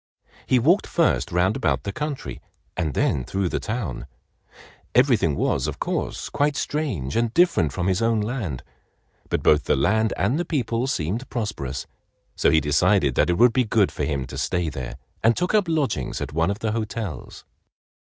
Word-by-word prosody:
He 130 - +4
walked 165 - +3
first 165 - +1
round 90 +4 +2
about 135 - 0
the 100 - -3
country 150 +2 -5 0.3
and 75 -4 -2
then 65 - +1
through 95 +6 -1
the - - -1
town. 95 - -4 0.9
Everything 120 - +4
was, - - 0
of - - -4
course, - - -3
quite 145 0 +1
strange, 135 - -2
and 115 -1 +1
different 170 - +3
from 90 +4 -3
his 95 +1 +1
own 115 -1 +2
land. 105 - -3 0.7
But - - -1
both 75 -1 +4
the - - +2
land 110 +10 +2
and 115 - +1
the - - +1
people 125 -6 -1
seemed 115 - -2
prosperous, 105 - -4 0.5
so - - +3
he 80 - +5
decided 75 +1 +2
that - - +2
it 85 - +2
would 120 +2 +5
be 130 - +3
good 110 -3 +2
for - - -4
him 70 -2 -1
to 65 - -7
stay 90 -2 0
there 65 -4 -6 0.3
and 115 +1 +4
took 180 +3 0
up 210 -3 +4
lodgings 155 -8 -1
at - - -5
one 80 +3 +1
of 100 - -1
the 110 0 -2
hotels. 110 - -5
105 Hz, 180 wpm, -24 LUFS, 80-125 Hz, 0.9 s, he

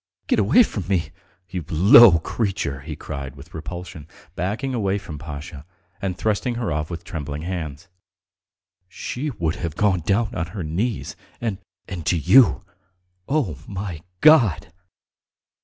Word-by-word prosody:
Get - - +2
away 115 - +6
from 100 - -5
me... 85 -6 0 0.4
you 90 -3 -3
low 95 +3 +8
creature!" 90 - -2
he 75 +3 -7
cried 70 -3 -7
with 70 +4 -14
repulsion, 85 -1 -7 0.3
backing 110 +9 -2
away 100 -4 0
from 80 -7 -8
Pasha, 75 0 -8 0.4
and 95 -2 -2
thrusting 110 +3 0
her 115 -2 -2
off 75 0 -2
with 85 -1 -6
trembling 75 -5 -5
hands. 85 -2 -5 1.0
"She 125 +9 -4
would 85 - -2
have 85 -3 -4
gone 100 -3 +2
down 100 +7 0
on 85 -6 -2
her 95 - -2
knees, 95 +9 -2 0.2
and... 110 -5 -3 0.3
and 90 -3 -6
to 90 - +3
you! 85 - +5 0.7
Oh, 135 - 0
my 95 -5 -5 0.2
God!" 120 - +5
90 Hz, 140 wpm, -23 LUFS, 80-105 Hz, 1.0 s, low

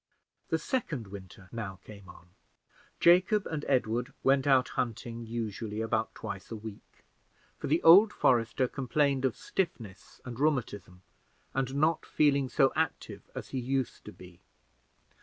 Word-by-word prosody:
The - - +2
second 165 - -3
winter 95 -1 -11
now 105 -5 -5
came 100 -3 -13
on. 90 - -15 0.7
Jacob 185 +4 +4
and 155 -2 -4
Edward 120 -2 0
went 135 0 +3
out 130 -2 +4
hunting 115 0 -4
usually 110 -2 -4
about 110 0 -1
twice 100 -3 -7
a 115 - -5
week; 110 -1 -11 0.6
for - - -4
the 160 +4 +1
old 195 +6 +8
forester 120 - +2
complained 135 +1 0
of 125 -5 -1
stiffness 115 - -4
and 125 -1 -7
rheumatism, 105 - -1 0.5
and 135 0 -2
not 155 +3 +2
feeling 140 -3 +2
so 135 +1 +3
active 160 0 -3
as - - -6
he 130 - -3
used 130 0 -2
to - - -8
be. 90 -1 -15
125 Hz, 140 wpm, -30 LUFS, 110-140 Hz, 0.7 s, old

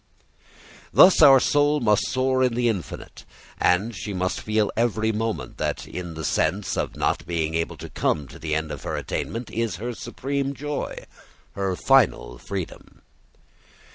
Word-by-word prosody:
Thus 185 -2 +7
our 135 -3 +9
soul 145 +2 +2
must 105 -5 +2
soar 130 0 +1
in 125 -2 +2
the 120 0 +1
infinite, 100 -7 -4 0.4
and 100 +6 +2
she 100 -2 -5
must 95 0 -1
feel 110 -1 0
every 110 -1 +1
moment 105 - -3
that - - -2
in 85 -2 -6
the 80 -1 -5
sense 95 +6 0
of - - -2
not - - 0
being 80 -2 -1
able 80 0 -2
to - - -8
come 75 -2 -1
to 80 +5 -12
the 80 -1 -2
end 80 0 -2
of - - -6
her - - -3
attainment 115 +1 -4
is 115 -5 -1
her 120 +7 -4
supreme 140 +4 -3
joy, 145 +1 -4 0.5
her 95 -2 -2
final 100 - +2
freedom. 95 -4 -7
110 Hz, 160 wpm, -24 LUFS, 90-130 Hz, 0.5 s, our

